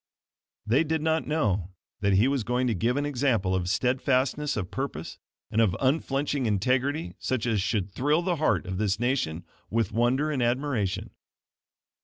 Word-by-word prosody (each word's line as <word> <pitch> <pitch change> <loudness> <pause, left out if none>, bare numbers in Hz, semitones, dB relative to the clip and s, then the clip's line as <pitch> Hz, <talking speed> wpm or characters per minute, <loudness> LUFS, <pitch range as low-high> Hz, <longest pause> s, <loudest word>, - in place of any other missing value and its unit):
They 125 +8 +3
did 160 0 -1
not 160 0 +1
know 100 - 0 0.2
that 100 -1 +2
he 100 +6 +4
was 135 -3 0
going 125 +3 0
to 120 - +1
give 115 +7 0
an 145 - 0
example 120 -9 +1
of 90 -1 0
steadfastness 130 +5 +1
of 90 -4 -3
purpose 135 - -5 0.3
and 110 0 +3
of 105 -3 +2
unflinching 135 -1 0
integrity, 130 - 0
such 130 -3 -1
as 110 -4 +1
should 100 -1 -1
thrill 150 - +1
the 175 -2 0
heart 155 - +1
of 95 0 -4
this 105 -1 0
nation 115 -10 -1 0.2
with 115 +1 0
wonder 130 +6 +1
and 135 -4 -1
admiration. 120 -5 -1
125 Hz, 165 wpm, -27 LUFS, 105-140 Hz, 0.3 s, he